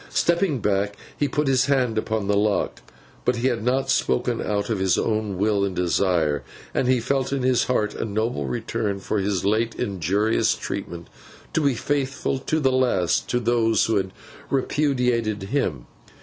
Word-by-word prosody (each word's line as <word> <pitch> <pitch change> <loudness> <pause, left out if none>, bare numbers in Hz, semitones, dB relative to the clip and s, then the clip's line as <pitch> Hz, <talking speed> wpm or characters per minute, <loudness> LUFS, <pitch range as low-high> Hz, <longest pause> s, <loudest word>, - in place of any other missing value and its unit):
Stepping 170 -3 +1
back, 100 0 0 0.2
he 145 - 0
put 150 +2 0
his 130 -1 +3
hand 130 -5 +2
upon 110 -1 -1
the 100 - +2
lock. 105 0 0 0.4
But 125 - +2
he 120 +2 +1
had 115 -3 -2
not 130 +3 +1
spoken 65 - +1
out 105 +1 -1
of 105 - 0
his 95 -1 +2
own 105 -3 -1
will 100 0 +2
and 95 -2 -1
desire; 85 -4 +1 0.3
and 130 - +1
he 130 -1 +3
felt 135 +3 -1
it - - +1
in 135 - -2
his 130 -1 +3
heart 105 -4 0
a - - -4
noble 110 - -2
return 100 - -2
for 105 +2 -1
his 95 -2 -1
late 110 +3 +1
injurious 100 +4 +1
treatment 85 -1 -6 0.5
to 160 - +2
be 140 -3 +2
faithful 135 +1 -1
to 155 +4 -1
the 135 -3 +2
last 120 -10 +1
to 120 - +1
those 115 -2 +2
who 110 -2 +1
had 95 -1 -1 0.4
repudiated 125 -7 0
him. 95 - -1
110 Hz, 180 wpm, -24 LUFS, 100-130 Hz, 0.5 s, his